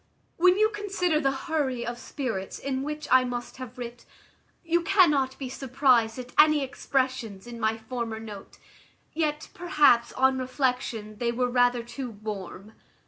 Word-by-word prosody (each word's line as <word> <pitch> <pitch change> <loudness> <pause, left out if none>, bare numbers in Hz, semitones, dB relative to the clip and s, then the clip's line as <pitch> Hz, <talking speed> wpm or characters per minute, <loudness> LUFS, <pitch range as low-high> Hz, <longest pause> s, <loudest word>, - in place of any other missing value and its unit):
"When 365 +2 +5
you 430 +1 +4
consider 395 -6 0
the 275 -3 +2 0.2
hurry 270 -7 -1
of 240 0 -5
spirits 225 -11 -4
in 265 -1 -3
which 300 +1 -5
I 260 0 +7
must 245 -1 -5
have 255 -1 -9
writ, 240 -1 -7 0.6
you 340 +1 +2
cannot 300 -8 +3
be 270 - -5
surprized 255 -3 +2
at 250 -1 -7
any 305 -1 +6
expressions 255 -6 -2
in 240 -1 -8
my 220 0 +1
former 225 -1 -5
note. 210 -3 -10 0.6
Yet, 305 -1 -1
perhaps, 300 -9 +3
on 265 0 +3
reflection, 250 -5 -2
they 235 -1 +1
were 245 +1 0
rather 245 -1 +3
too 250 +2 -6
warm. 210 -1 -7
255 Hz, 150 wpm, -27 LUFS, 235-295 Hz, 0.6 s, I